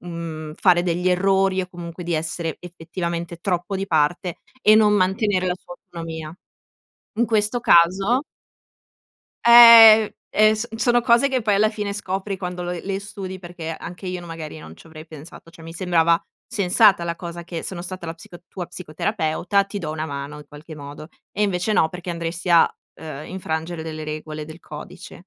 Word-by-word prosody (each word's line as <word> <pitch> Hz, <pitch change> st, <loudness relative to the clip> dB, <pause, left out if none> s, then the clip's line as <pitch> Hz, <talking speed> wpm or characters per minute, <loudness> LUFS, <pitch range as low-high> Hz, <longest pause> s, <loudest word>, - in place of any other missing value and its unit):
mhmm, 165 Hz, -3 st, -7 dB
fare 175 Hz, -2 st, +4 dB
degli 180 Hz, +1 st, 0 dB
errori 190 Hz, +1 st, +2 dB
o 180 Hz, -, -8 dB
comunque 175 Hz, 0 st, -8 dB
di 170 Hz, -, -3 dB
essere 165 Hz, 0 st, -3 dB
effettivamente 170 Hz, 0 st, -5 dB
troppo 180 Hz, +2 st, -2 dB
di 195 Hz, +1 st, -3 dB
parte, 170 Hz, +1 st, 0 dB, 0.2 s
e 215 Hz, -3 st, +6 dB
non 215 Hz, -1 st, +5 dB
mantenere 190 Hz, -1 st, +1 dB
la 180 Hz, -, 0 dB
sua -, -, -12 dB
autonomia. 165 Hz, -2 st, -8 dB, 0.8 s
In 235 Hz, -, +4 dB
questo 220 Hz, +1 st, 0 dB
caso 195 Hz, -, +4 dB, 1.2 s
Ehm, 230 Hz, -2 st, +10 dB, 0.2 s
ehm, 215 Hz, 0 st, +4 dB
so 220 Hz, +2 st, -4 dB
sono 240 Hz, +1 st, +2 dB
cose 240 Hz, +3 st, +3 dB
che 260 Hz, -3 st, -1 dB
poi 210 Hz, -2 st, +2 dB
alla 215 Hz, +2 st, +3 dB
fine 210 Hz, -2 st, -4 dB
scopri 195 Hz, 0 st, -4 dB
quando 180 Hz, -1 st, -5 dB
lo 175 Hz, -, -4 dB
le 195 Hz, +2 st, -4 dB
studi 195 Hz, -2 st, -7 dB
perché 175 Hz, -2 st, -8 dB
anche 180 Hz, +2 st, -9 dB
io 180 Hz, -1 st, -4 dB
n 175 Hz, -, -11 dB
magari 160 Hz, -2 st, -8 dB
non 80 Hz, -, -12 dB
ci -, -, -17 dB
avrei 160 Hz, -1 st, -12 dB
pensato, 160 Hz, +2 st, -13 dB
cioè 165 Hz, -1 st, -15 dB
mi 165 Hz, -, -9 dB
sembrava 170 Hz, -1 st, +2 dB, 0.3 s
sensata 195 Hz, -1 st, +3 dB
la 170 Hz, 0 st, -3 dB
cosa 170 Hz, 0 st, -8 dB
che: 170 Hz, -1 st, -6 dB
sono 175 Hz, -2 st, -5 dB
stata 185 Hz, -1 st, -7 dB
la 165 Hz, -, -5 dB
psico 170 Hz, +1 st, -13 dB
tua 180 Hz, -2 st, -6 dB
psicoterapeuta 180 Hz, +2 st, -1 dB
ti 200 Hz, +1 st, -6 dB
do 165 Hz, -5 st, -5 dB
una 155 Hz, 0 st, -4 dB
mano 140 Hz, 0 st, -6 dB
in 150 Hz, -, -13 dB
qualche 155 Hz, +2 st, -11 dB
modo. 145 Hz, +1 st, -10 dB, 0.2 s
E 210 Hz, -, -1 dB
invece 195 Hz, +1 st, 0 dB
no 160 Hz, -, +3 dB
perché 180 Hz, +1 st, -7 dB
andresti 170 Hz, +1 st, -4 dB
a, 170 Hz, -1 st, +6 dB, 0.3 s
ehm, 155 Hz, -2 st, -8 dB
infrangere 165 Hz, -2 st, -4 dB
delle 155 Hz, -1 st, -6 dB
regole 155 Hz, 0 st, -6 dB
del 155 Hz, +2 st, -12 dB
codice. 175 Hz, +4 st, -11 dB
175 Hz, 180 wpm, -22 LUFS, 165-195 Hz, 1.2 s, Ehm